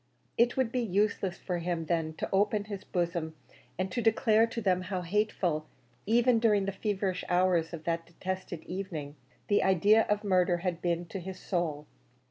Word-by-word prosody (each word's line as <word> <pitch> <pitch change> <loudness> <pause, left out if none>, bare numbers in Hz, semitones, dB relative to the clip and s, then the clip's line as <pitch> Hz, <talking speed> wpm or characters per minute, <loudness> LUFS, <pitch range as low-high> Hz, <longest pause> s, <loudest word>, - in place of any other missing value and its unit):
It 240 +2 +3
would 260 -3 +1
be 255 - 0
useless 200 -3 0
for 180 -2 -3
him, 170 -1 -2
then, 160 -1 -1
to - - -4
open 205 +1 +2
his 205 -2 -7
bosom 170 -3 -2 0.4
and 185 +1 -2
to 245 - -1
declare 225 0 +4
to 230 - -5
them 185 -4 +1
how 185 -1 -3
hateful 175 -5 0 0.4
even 240 +1 +4
during 210 -4 +3
the 195 - -1
feverish 195 -2 -2
hours 180 -2 +2
of 165 -2 -7
that 165 0 -2
detested 185 -1 -5
evening 170 -6 -5 0.3
the 205 - +3
idea 200 +4 +4
of 210 0 +1
murder 180 -3 +3
had 180 -2 -1
been 175 0 0
to 195 - -5
his 185 +1 -7
soul. 160 -5 -2
185 Hz, 175 wpm, -30 LUFS, 170-210 Hz, 0.4 s, declare